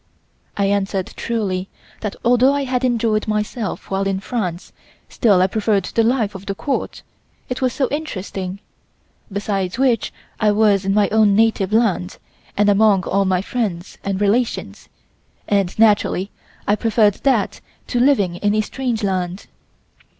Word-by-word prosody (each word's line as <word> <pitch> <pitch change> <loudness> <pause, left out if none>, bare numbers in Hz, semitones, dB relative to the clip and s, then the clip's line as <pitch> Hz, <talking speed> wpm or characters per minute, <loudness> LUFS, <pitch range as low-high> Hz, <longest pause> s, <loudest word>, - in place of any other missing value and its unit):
I 200 - +2
answered 195 -1 -1
truly 195 -5 -2 0.3
that 210 -2 -4
although 245 +3 +4
I 285 - 0
had 255 -1 -1
enjoyed 230 -4 +1
myself 210 0 -3
while 195 0 0
in 195 -1 -1
France 190 -5 -4 0.4
still 200 -6 +3
I - - +5
preferred 205 -1 0
the 230 - 0
life 225 -3 +1
of 190 0 -10
the 195 - -2
Court, 275 +6 -3 0.5
it 250 - -4
was 255 -1 +2
so 265 +1 0
interesting, 195 -10 -4 0.7
besides 195 -1 -2
which 255 -3 +1 0.3
I 210 -1 +3
was 205 -2 +3
in 195 +1 +1
my 210 -1 +4
own 215 -2 +4
native 220 -3 +2
land 210 -5 +1 0.4
and 205 0 +3
among 205 -2 +4
all 195 +2 +1
my 185 -1 +1
friends 200 -7 -3
and 195 -1 -2
relations, 220 +4 -1 0.6
and 195 -3 0
naturally 205 -3 +2 0.4
I 205 - +4
preferred 215 -2 +2
that 245 -8 +1 0.2
to 245 - -1
living 210 -10 +2
in 205 +2 +1
a 215 - +3
strange 240 0 -3
land. 185 -1 -2
205 Hz, 150 wpm, -20 LUFS, 195-230 Hz, 0.7 s, I